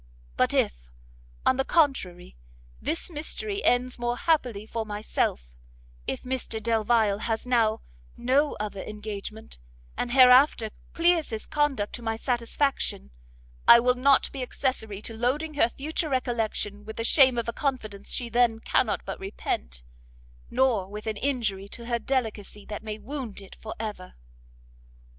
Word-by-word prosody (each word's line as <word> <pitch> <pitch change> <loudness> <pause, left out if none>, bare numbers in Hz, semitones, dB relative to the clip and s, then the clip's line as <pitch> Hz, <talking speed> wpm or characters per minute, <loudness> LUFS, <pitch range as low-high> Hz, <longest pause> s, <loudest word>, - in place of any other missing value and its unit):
But - - +2
if, - - 0 0.6
on 260 - +4
the 270 - +2
contrary, 265 - +1 0.5
this 335 +2 -2
mystery 400 +7 -3
ends 250 0 +2
more 240 0 -1
happily 250 -11 +1
for 225 0 -3
myself, 205 - -2 0.6
if - - -3
Mr 255 -3 -3
Delvile 220 -2 +2
has 225 +1 -2
now 225 -3 +2 0.4
no 280 +4 +2
other 205 -2 -4
engagement, 210 - -7 0.4
and 245 - -2
hereafter 250 -3 +6 0.2
clears 335 -1 +3
his 220 -2 -4
conduct 275 -8 0
to 240 - -6
my 225 -1 -1
satisfaction, 240 - -1 0.6
I 235 - +10
will 250 +1 +3
not 265 +2 +3
be 270 - -5
accessory 220 -5 -3
to 230 - -5
loading 280 +7 -1
her 260 -5 +3
future 310 +5 -3
recollection 225 -5 -1
with 220 +1 -8
the 230 - -1
shame 260 0 +5
of 235 - -1
a 235 - -2
confidence 215 -8 -3
she 245 - -2
then 235 -1 +3
cannot - - +1
but - - -5
repent, - - -4 0.7
nor 240 -8 +2
with 210 +1 -7
an 220 -1 -2
injury 210 -7 -1
to 235 +1 -8
her 235 0 0
delicacy 220 -5 -2
that 210 - -6
may 215 -1 -5
wound 250 -3 -5
it 195 -1 -12
for 220 - -6
ever." 210 -5 -6
235 Hz, 150 wpm, -27 LUFS, 210-260 Hz, 0.7 s, I